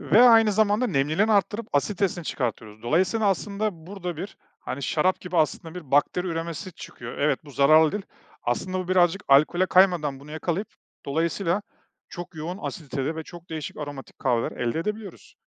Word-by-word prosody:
ve 225 +4 +5
aynı 225 -3 +7
zamanda 215 +3 +2
nemliliğini 160 +6 +2
arttırıp 210 +2 +1
asiditesini 180 +3 0
çıkartıyoruz. 110 -5 -4
Dolayısıyla, 185 - +2
aslında, 200 -3 -2
burada 180 -4 -5
bir, 190 +6 -7 0.2
hani, 140 - -5
şarap 165 +7 +1
gibi, 180 -1 -5
aslında, 160 +1 0
bir 160 -7 -9
bakteri 145 +6 +2
üremesi 170 +2 -4
çıkıyor. 140 -8 -9
Evet, 150 +2 +1
bu 145 - -12
zararlı 155 +3 +5
değil. 205 -2 -3 0.4
Aslında, 185 +10 -1
bu 185 -1 -4
birazcık 185 +2 +3
alkole 155 +7 +5
kaymadan 175 -8 +3
bunu 145 +2 -13
yakalayıp, 170 +6 -2 0.4
dolayısıyla 170 +6 0 0.5
çok 175 0 -8
yoğun 165 +4 -5
asiditede 155 -3 -4
ve 160 - -4
çok 175 +1 -13
değişik 155 -2 -5
aromatik 145 -2 -8
kahveler 120 -3 +1
elde 120 +4 -2
edebiliyoruz. 210 +4 -5
170 Hz, 160 wpm, -25 LUFS, 150-195 Hz, 0.5 s, aynı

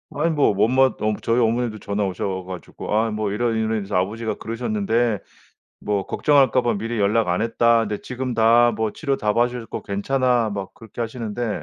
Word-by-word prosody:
아니 160 +3 +1
뭐 145 -7 +3
엄마 130 +4 +4
어 110 -5 +1
저희 115 +2 +2
어머니도 115 -1 0
전화 100 0 -2
오셔 95 0 -3
가지고 90 +2 -7
"아 110 +1 +2
뭐 105 -1 -2
이런, 115 +1 0
이런 110 0 0
일이 105 - -3
있어서 95 - -5
아버지가 110 +3 -2
그러셨는데 120 - -1 0.6
뭐 100 -2 -1
걱정할까 135 -3 +3
봐 120 - +1
미리 115 +3 -3
연락 105 0 +2
안 90 - +1
했다. 115 0 +3
근데 105 -2 -2
지금 130 0 -4
다 120 +1 +5
뭐 110 0 -1
치료 140 -4 -1
다 105 -3 0
받으셨고 120 -1 -1
괜찮아." 120 +2 0
막 100 -2 -5
그렇게 110 +1 -11
하시는데 115 -1 -4
115 Hz, 390 characters per minute, -22 LUFS, 105-120 Hz, 0.6 s, 다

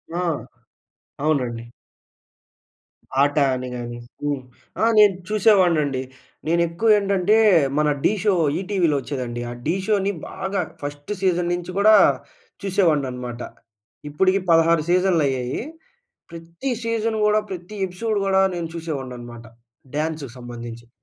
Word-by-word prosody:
ఆ! - - -1 1.0
అవునండి. 120 -6 -1 1.5
ఆట 145 0 +2 0.2
అని 130 0 -5
గానీ. 120 0 -6 0.3
హ్మ్. 145 -2 -1 0.4
ఆ! - - +3
నేను 205 -3 +7
చూసేవాడినండి. 175 -10 +3 0.5
నేనెక్కువేంటంటే, 195 +4 +3 0.4
మన 150 0 +3
ఢీ - - +3
షో 205 -2 +3 0.3
ఈటీలో 180 -6 +1
ఒచ్చేదండి. 125 -4 -4
ఆ - - -5
ఢీ 165 +4 +1
షోని 200 -2 +2 0.2
బాగా 190 0 -2 0.2
ఫస్ట్ 145 +4 -6
సీజన్ 180 -2 +1
నించి 175 0 -4
గూడా 215 +1 +6 0.7
చూసేవాడిననమాట. 135 - 0 0.7
ఇప్పడుకి 190 +5 +2
16 165 -1 +4
సీజన్‌లయ్యాయి. 150 -9 +1 0.7
ప్రతి 170 +10 -6
సీజన్ 230 -1 -1
గూడా, 210 0 +3
ప్రతి 180 +3 -7
ఎపిసోడ్ 210 +4 -2
గూడా 190 0 +3
నేను 165 -1 -4
చూసేవాడిననమాట, 125 -7 -6 0.5
డాన్సుకి 150 -5 -3
సంబంధించి. 120 -1 -9
165 Hz, 105 wpm, -22 LUFS, 135-195 Hz, 1.5 s, నేను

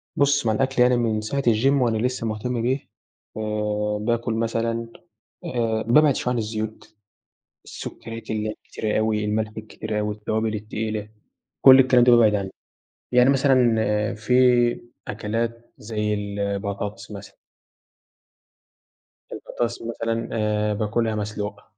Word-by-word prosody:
بُص، 140 -3 +2
مع 110 - +2
الأكل 135 +2 0
يعني 125 0 +5
من 110 -2 0
ساعة 140 +6 -2
الgym 130 +3 +3
وأنا 115 -3 +1
لسّه 125 0 -1
مُهتم 115 +2 -2
بيه، 130 +3 -1 0.5
آآ 105 -1 -1
باكُل 115 +1 -1
مثلًا 115 0 -1 0.6
آآ 115 -7 -1
بابعِد 145 +2 +5
شوية 125 - -1
عن - - -1
الزيوت، 110 0 -5 0.7
السُكّريات 115 0 -8
اللي 110 0 -1
هي - - -2
الكتيرة 110 -1 -3
أوي، 110 -1 0
الملح 110 +1 -1
الكتير 110 0 -5
أوي، 105 0 -2
التوابل 110 +1 -2
التقيلة، 105 0 -4 0.6
كل 130 0 +10
الكلام 125 -2 +5
ده 125 - +5
بابعِد 110 -3 +5
عنّه. 100 -2 -2 0.6
يعني 125 +1 +5
مثلًا 130 -4 +4 0.4
في 110 +4 -2 0.7
أكلات 115 +2 -4
زي 105 -1 -2
البطاطس 100 0 -4
مثلًا. 100 0 -10 2.0
البطاطس 120 -1 -4
مثلًا 115 0 -3
آآ 105 -1 0
باكُلها 110 +2 -1
مسلوقة، 105 0 -4
110 Hz, 125 wpm, -23 LUFS, 105-120 Hz, 2.0 s, كل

